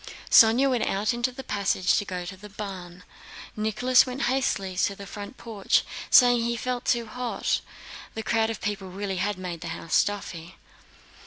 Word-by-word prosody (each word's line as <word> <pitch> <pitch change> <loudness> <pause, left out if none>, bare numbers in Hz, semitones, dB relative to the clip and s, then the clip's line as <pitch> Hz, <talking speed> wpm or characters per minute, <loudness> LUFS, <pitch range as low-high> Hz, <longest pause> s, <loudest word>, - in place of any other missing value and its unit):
Sónya 230 +5 +7
went 250 -3 0
out 205 +4 0
into 240 +2 -1
the 265 +2 -9
passage 200 -4 +1
to 205 - -4
go 180 -2 -5
to 190 +2 -7
the 210 +2 -12
barn. 185 -4 -8 0.5
Nicholas 220 +4 +3
went 255 +1 -4
hastily 240 -7 0
to 200 +1 +1
the 200 - -9
front 205 +6 -9
porch, 215 -4 0 0.3
saying 245 -1 +6
he 235 0 -1
felt 250 0 -3
too 235 -2 +1
hot. 245 +2 -2 0.5
The 220 - -4
crowd 225 0 +1
of 225 - -5
people 200 -2 -3
really 195 0 -4
had 200 +2 -1
made 180 -3 -6
the - - -6
house 165 - -8
stuffy. 185 -4 -1
210 Hz, 175 wpm, -26 LUFS, 190-240 Hz, 0.5 s, Sónya